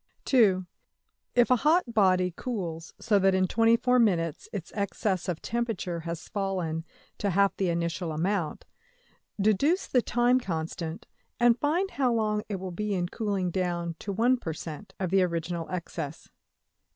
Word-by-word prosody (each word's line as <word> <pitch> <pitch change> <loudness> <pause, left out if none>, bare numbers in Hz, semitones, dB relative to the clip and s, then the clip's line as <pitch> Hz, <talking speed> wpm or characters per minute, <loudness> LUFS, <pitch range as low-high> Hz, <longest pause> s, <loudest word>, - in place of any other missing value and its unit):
\Item{(2)} 200 -8 +4 0.7
If 245 0 +4
a 250 - +6
hot 300 -2 +2
body 185 -4 +3
cools 170 -10 -5
so 210 -3 +3
that 195 0 +4
in 190 0 +3
$24$~minutes 225 - +2
its 190 -5 -6
excess 200 -2 -1
of 170 -3 -3
temperature 225 -7 -2
has 165 0 -6
fallen 180 -6 -2 0.3
to 205 - 0
half 200 +2 +3
the 190 -2 +1
initial 170 0 -1
amount, 170 +1 -1 0.7
deduce 215 - +2
the 250 - +2
time 245 +2 +3
constant, 165 -4 -4 0.3
and 240 0 +4
find 345 +7 +1
how 260 -3 +1
long 215 -2 +1
it 205 - -2
will 190 -1 -5
be 210 +3 -2
in 175 -1 -1
cooling 200 -5 -1
down 175 -2 -2
to 200 - -4
$1$~per~cent.\ 200 - -1
of 185 -2 -2
the 195 0 +4
original 170 -1 -2
excess. 165 -4 -5
195 Hz, 145 wpm, -28 LUFS, 170-230 Hz, 0.7 s, a